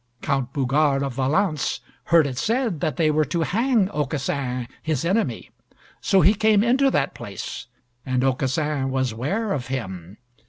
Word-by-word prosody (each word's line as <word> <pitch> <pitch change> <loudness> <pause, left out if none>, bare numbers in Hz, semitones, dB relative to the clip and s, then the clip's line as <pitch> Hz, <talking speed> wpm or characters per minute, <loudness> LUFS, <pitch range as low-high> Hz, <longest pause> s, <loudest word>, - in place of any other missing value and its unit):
Count 135 -3 -1
Bougart 140 +1 +1
of 135 -2 -3
Valence 150 +5 0 0.3
heard 165 -2 +5
it 130 -2 -3
said 225 - 0
that 150 -3 -2
they 155 -2 +3
were 155 +1 +2
to 165 +4 -2
hang 225 +3 +2
Aucassin, 135 -4 -2
his 155 -2 -1
enemy, 200 +6 -1 0.5
so 195 -3 +3
he 190 +7 +6
came 215 -1 +3
into 265 +4 +3
that - - 0
place - - -7 0.4
and 130 -1 0
Aucassin 135 +1 0
was 130 -3 -1
ware 195 - -1
of 125 -7 -3
him. 95 -7 -5
145 Hz, 155 wpm, -23 LUFS, 130-195 Hz, 0.5 s, he